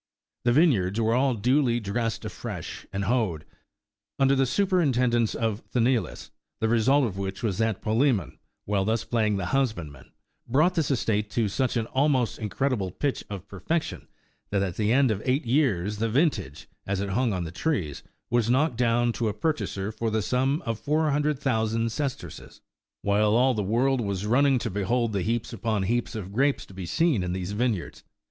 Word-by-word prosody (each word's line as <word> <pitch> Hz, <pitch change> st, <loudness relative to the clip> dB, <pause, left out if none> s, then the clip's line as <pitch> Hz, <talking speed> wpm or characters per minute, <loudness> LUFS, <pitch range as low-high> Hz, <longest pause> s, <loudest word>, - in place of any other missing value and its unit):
The 120 Hz, -, +4 dB
vineyards 120 Hz, -, +3 dB
were 115 Hz, 0 st, +2 dB
all 130 Hz, +1 st, +2 dB
duly 120 Hz, +2 st, +2 dB
dressed 115 Hz, +2 st, -2 dB
afresh, -, -, -6 dB
and 100 Hz, +1 st, -2 dB
hoed, 100 Hz, -8 st, 0 dB, 0.7 s
under 135 Hz, 0 st, +4 dB
the 135 Hz, -1 st, +2 dB
superintendence 130 Hz, -, +2 dB
of 110 Hz, -1 st, -1 dB
Sthenelus; 120 Hz, -6 st, 0 dB, 0.3 s
the 110 Hz, -, +1 dB
result 125 Hz, +5 st, +3 dB
of 100 Hz, -4 st, -4 dB
which 95 Hz, +3 st, -4 dB
was 105 Hz, -3 st, -1 dB
that 110 Hz, -3 st, 0 dB
Palsemon, 110 Hz, -, +1 dB, 0.3 s
while 100 Hz, -1 st, +1 dB
thus 110 Hz, +3 st, 0 dB
playing 110 Hz, -3 st, 0 dB
the 95 Hz, -, -2 dB
husbandman, 85 Hz, -, -2 dB, 0.4 s
brought 155 Hz, +9 st, +3 dB
this 160 Hz, -5 st, 0 dB
estate 110 Hz, -5 st, 0 dB
to 110 Hz, 0 st, 0 dB
such 125 Hz, +5 st, 0 dB
an 115 Hz, -, 0 dB
almost 130 Hz, -1 st, +1 dB
incredible 105 Hz, -1 st, -1 dB
pitch 140 Hz, +9 st, -2 dB
of 100 Hz, -1 st, -7 dB
perfection, 155 Hz, -, -3 dB, 0.4 s
that 100 Hz, -1 st, +1 dB
at 90 Hz, -3 st, -3 dB
the 105 Hz, 0 st, +1 dB
end 130 Hz, -1 st, +4 dB
of 105 Hz, -1 st, -2 dB
eight 130 Hz, +2 st, 0 dB
years 115 Hz, -, +1 dB
the 115 Hz, +2 st, 0 dB
vintage, 115 Hz, -, 0 dB, 0.2 s
as 95 Hz, -1 st, -1 dB
it 100 Hz, 0 st, -2 dB
hung 120 Hz, +4 st, +1 dB
on 90 Hz, -3 st, -2 dB
the 80 Hz, -, -6 dB
trees, 90 Hz, -, -2 dB, 0.3 s
was 120 Hz, -2 st, +2 dB
knocked 130 Hz, 0 st, +2 dB
down 120 Hz, 0 st, +2 dB
to 115 Hz, -, -1 dB
a 105 Hz, -, -4 dB
purchaser 105 Hz, -7 st, -2 dB
for 115 Hz, +1 st, -2 dB
the 110 Hz, -1 st, 0 dB
sum 135 Hz, -, 0 dB
of 115 Hz, -2 st, -2 dB
four 155 Hz, +1 st, +1 dB
hundred 150 Hz, 0 st, +1 dB
thousand 115 Hz, -3 st, 0 dB
sesterces; 140 Hz, +1 st, -5 dB, 0.4 s
while 105 Hz, +1 st, +3 dB
all 130 Hz, +2 st, +4 dB
the 110 Hz, -, -1 dB
world 120 Hz, +6 st, +1 dB
was 100 Hz, -2 st, -2 dB
running 135 Hz, +4 st, +3 dB
to 115 Hz, -3 st, -3 dB
behold 110 Hz, +4 st, 0 dB
the 100 Hz, -, 0 dB
heaps 115 Hz, +4 st, -2 dB
upon 110 Hz, -3 st, -1 dB
heaps 120 Hz, +4 st, -1 dB
of 100 Hz, -3 st, -6 dB
grapes 140 Hz, +5 st, +1 dB
to -, -, -15 dB
be 95 Hz, -2 st, -6 dB
seen 155 Hz, -, +2 dB
in 90 Hz, 0 st, -2 dB
these 95 Hz, +1 st, -3 dB
vineyards. 105 Hz, -3 st, -2 dB
115 Hz, 180 wpm, -26 LUFS, 100-130 Hz, 0.7 s, The